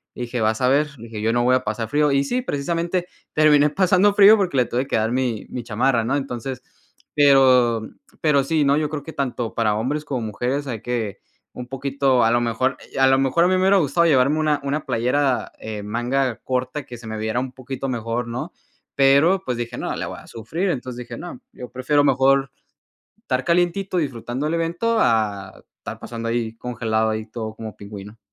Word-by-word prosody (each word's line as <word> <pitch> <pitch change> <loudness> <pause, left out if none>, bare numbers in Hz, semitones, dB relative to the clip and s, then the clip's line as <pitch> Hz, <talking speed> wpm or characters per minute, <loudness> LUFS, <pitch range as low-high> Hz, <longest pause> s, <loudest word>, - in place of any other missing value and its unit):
Dije: 120 0 -4
"Vas 110 +2 +1
a 125 - +3
ver", 145 +3 +3
dije: 115 -1 -8
"Yo 115 +1 +1
no 120 0 +2
voy 125 +1 +4
a 130 - 0
pasar 110 0 -3
frío". 150 +1 +2
Y 140 0 +2
sí, 245 - -1
precisamente 170 - -2 0.3
terminé 150 -1 +5
pasando 190 +3 +3
frío 205 +2 +8
porque 185 -8 -1
le 125 - +4
tuve 125 +3 -2
que - - -1
dar 110 +1 0
mi 125 -4 -1
mi 125 - -5
chamarra, 115 +2 +1
¿no? 130 +4 0
Entonces, 130 -2 -4 0.5
pero 130 -5 +5 0.4
pero 145 -3 +3
sí, 155 +1 +1
¿no? 140 +1 +3
Yo 155 -1 0
creo 150 -2 -5
que 160 - -9
tanto 125 -4 -3
para 110 -3 +1
hombres 140 +8 -2
como 130 -4 -3
mujeres 125 +7 -2
hay 115 -5 -4
que 115 -5 -3 0.4
un 125 - -7
poquito, 135 -1 +1
a 115 - +4
lo 120 - +3
mejor, 120 +3 0 0.2
eh, - - -4
a 135 - +6
lo 135 0 +4
mejor 135 +6 +2
a - - +4
mí 185 - +2
me 185 - +1
hubiera 195 +1 +5
gustado 170 0 +2
llevarme 140 0 +3
una 150 -2 +1
una 140 +2 -2
playera, 125 +3 0
eh, 110 -1 -6
manga 120 +4 -1
corta 130 +2 -2
que 120 -3 -9
se 115 - -11
me 110 0 -5
viera 110 +2 -1
un 130 0 -4
poquito 130 +1 -5
mejor, 120 0 -3
¿no? 120 +1 -5 0.4
Pero, 140 +7 +4
pues 125 -2 -2
dije: 120 0 -4
"No, - - -3
le - - -4
voy - - -7
a - - -16
sufrir", 155 - -3
entonces, 125 -3 -5
dije: - - -7
"No, 175 +8 -8
yo 125 - -9
prefiero 130 +4 +1
mejor 135 0 +3 0.7
estar 130 0 -2
calientito 180 +2 +1
disfrutando 130 -1 -3
del 160 - -1
evento, 170 +8 0
a 105 - 0 0.2
estar - - -8
pasando 115 -1 -5
ahí 115 -1 -2
congelado, 110 -2 -1
ahí 110 0 -3
todo 110 -1 -6
como 110 -1 -8
pingüino". 100 +1 -10
130 Hz, 210 wpm, -22 LUFS, 115-145 Hz, 0.7 s, frío